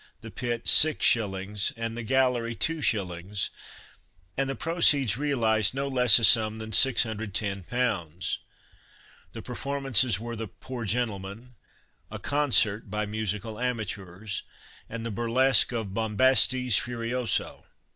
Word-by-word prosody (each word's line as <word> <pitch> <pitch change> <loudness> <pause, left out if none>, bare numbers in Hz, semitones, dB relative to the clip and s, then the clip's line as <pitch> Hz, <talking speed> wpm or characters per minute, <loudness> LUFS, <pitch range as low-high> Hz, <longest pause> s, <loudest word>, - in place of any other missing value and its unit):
the - - -10
pit, 120 -2 -4
6s., 105 -9 +3
and 115 0 -4
the 120 - -5
gallery, 125 -1 0
2s.; 100 - -2 0.9
and 135 0 -1
the 135 - -3
proceeds 145 - +2
realised 115 -6 0
no 140 +1 -2
less 125 -5 +5
a 120 - -1
sum 110 -1 +4
than 110 0 -8
610 110 -4 +1
pounds! 95 -8 -2 0.9
The - - -8
performances 135 -6 +1
were 115 +1 -6
the 110 0 -6
"Poor 120 +4 -8
Gentleman," 110 +1 -3 0.6
"A - - -7
Concert," 120 -8 +1
by 105 +1 -2
musical 110 +1 -4
amateurs, 105 -5 -4 0.5
and 115 0 -6
the 115 - -4
burlesque 120 +3 +2
of 110 -5 -4
"Bombastes 125 +2 +3
Furioso." 120 -2 -3
115 Hz, 115 wpm, -26 LUFS, 105-125 Hz, 0.9 s, less